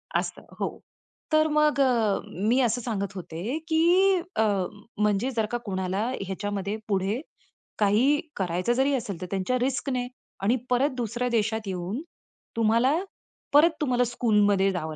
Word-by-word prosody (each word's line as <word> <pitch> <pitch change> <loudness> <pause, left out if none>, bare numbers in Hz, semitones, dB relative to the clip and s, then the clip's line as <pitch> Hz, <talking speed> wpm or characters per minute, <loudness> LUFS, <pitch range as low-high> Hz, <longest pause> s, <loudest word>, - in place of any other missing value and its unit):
असतं, - - -1 0.2
हो. - - -3 0.5
तर 310 0 +4
मग 300 -1 +2
अ, 230 -6 +2 0.3
मी 250 +3 +4
असं 245 0 +1
सांगत 205 -4 -3
होते, 185 - -4
की 355 +4 +4 0.2
अ, - - +3 0.5
म्हणजे 210 +4 +1
जर 225 -3 0
का 240 - 0
कोणाला 190 +1 -1 0.2
ह्याच्यामध्ये 200 +2 -3
पुढे, 200 +2 0 0.6
काही 225 +8 +4 0.2
करायचं 180 +4 0
जरी 265 +3 +2
असेल, 200 -8 -4
तर - - -3
त्यांच्या 195 +6 0
रिस्कने, 255 0 -1 0.4
आणि 220 +5 +3
परत 250 +3 +3
दुसऱ्या 240 +1 -2
देशात 220 -2 0
येऊन, 190 +6 -3 0.6
तुम्हाला, 230 +4 +3 0.6
परत 305 +4 +7
तुम्हाला 250 -4 +2
स्कूलमध्ये 210 -5 +2
जावं 160 -4 -4
225 Hz, 135 wpm, -26 LUFS, 200-255 Hz, 0.6 s, परत